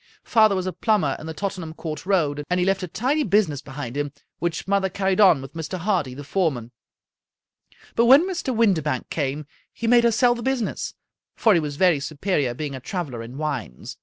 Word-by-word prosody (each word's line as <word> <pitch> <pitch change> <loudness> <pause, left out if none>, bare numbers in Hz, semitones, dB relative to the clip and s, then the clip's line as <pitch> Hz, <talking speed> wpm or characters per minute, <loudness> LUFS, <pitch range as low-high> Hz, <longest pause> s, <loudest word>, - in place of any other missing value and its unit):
Father 215 -3 +4
was 185 -1 -2
a 185 - -3
plumber 190 -12 +1
in 155 - -8
the 160 - -5
Tottenham 185 -5 -4
Court 155 0 -6
Road, 150 -7 +1
and 180 0 +1
he 180 - +2
left 195 +1 +1
a 185 - -3
tidy 260 - 0
business 195 - +1
behind 135 -3 -7
him, 145 0 -2 0.3
which 170 0 -2
mother 195 -1 +1
carried 190 +1 0
on 165 -9 +6
with 135 +1 -10
Mr. 165 +3 -5
Hardy, 175 -8 -1
the 145 - -8
foreman; 135 -9 -1 1.2
but 235 - +4
when 280 +8 +7
Mr. 345 -8 -2
Windibank 180 - +1
came 145 0 -2 0.3
he 230 - -6
made 240 +1 +5
her 235 - +4
sell 240 +2 +4
the 235 - -6
business, 255 -3 -2 0.4
for 220 - +4
he 170 - +4
was 150 -2 -4
very 175 -2 +3
superior, 145 -3 -1
being 145 +1 -4
a 130 - -5
traveler 140 -5 -5
in 120 +3 -9
wines. 140 - -5
175 Hz, 200 wpm, -23 LUFS, 145-205 Hz, 1.2 s, when